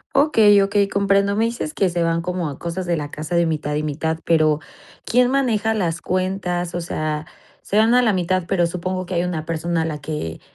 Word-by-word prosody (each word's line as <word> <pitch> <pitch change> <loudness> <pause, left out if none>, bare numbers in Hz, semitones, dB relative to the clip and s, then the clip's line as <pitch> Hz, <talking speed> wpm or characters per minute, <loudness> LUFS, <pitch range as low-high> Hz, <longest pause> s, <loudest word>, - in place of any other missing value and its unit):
Okey, 220 -8 +5
okey 200 0 +2
comprendo. 200 0 +2
Me 225 - +3
dices 230 -10 -3
que 195 - +1
se 170 -1 -1
van 165 0 +1
como 175 -2 -2
a 140 - -8
cosas 170 +2 -4
de 170 -1 0
la 145 -1 -4
casa 155 +3 -4
de 170 0 +3
mitad 150 -2 -2
y 150 - -1
mitad 160 +2 -2
pero, 155 -2 +3 0.5
¿quién 250 +1 +3
maneja 225 -5 +1
las 170 -6 -1
cuentas? 185 -2 -2
O 175 - -2
sea, 155 -2 -3 0.4
se 205 - -2
van 225 +2 +4
a 250 - +6
la 225 -3 +3
mitad, 185 -1 0
pero 175 -3 +1
supongo 185 +1 -3
que 185 - -6
hay 175 0 +1
una 165 -3 -3
persona 165 0 -1
la 155 -2 -4
que, 145 - -5
175 Hz, 215 wpm, -21 LUFS, 160-200 Hz, 0.5 s, a